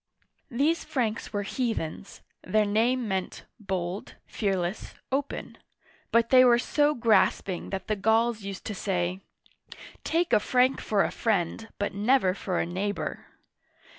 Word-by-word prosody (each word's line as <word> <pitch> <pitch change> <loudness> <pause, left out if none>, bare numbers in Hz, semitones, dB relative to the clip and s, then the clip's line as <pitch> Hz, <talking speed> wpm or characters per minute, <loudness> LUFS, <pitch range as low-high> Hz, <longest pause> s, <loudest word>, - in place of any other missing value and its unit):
These 290 +6 +1
Franks 235 -4 -2
were 205 -1 -2
heathen; 200 -6 -3 0.3
their 215 0 +2
name 230 +4 +1
meant 190 -2 -3
" - - -53
bold, 190 -2 -4
fearless, 190 -2 -2 0.2
open 280 +1 -3 0.3
"; - - -32
but 230 0 +3
they 255 -1 +8
were 240 -1 +6
so 295 +4 +2
grasping 215 -5 +2
that 195 -1 -4
the 215 - 0
Gauls 225 +2 +2
used 195 -1 -7
to 215 - -3
say, 185 -1 -2 0.8
Take 335 +1 0
a - - +6
Frank 255 +4 +2
for 205 -2 +2
a - - -1
friend, 215 0 -1
but 205 - -2
never 205 -1 +3
for 185 -2 -3
a - - 0
neighbor 195 +4 -3
215 Hz, 145 wpm, -27 LUFS, 195-245 Hz, 0.8 s, they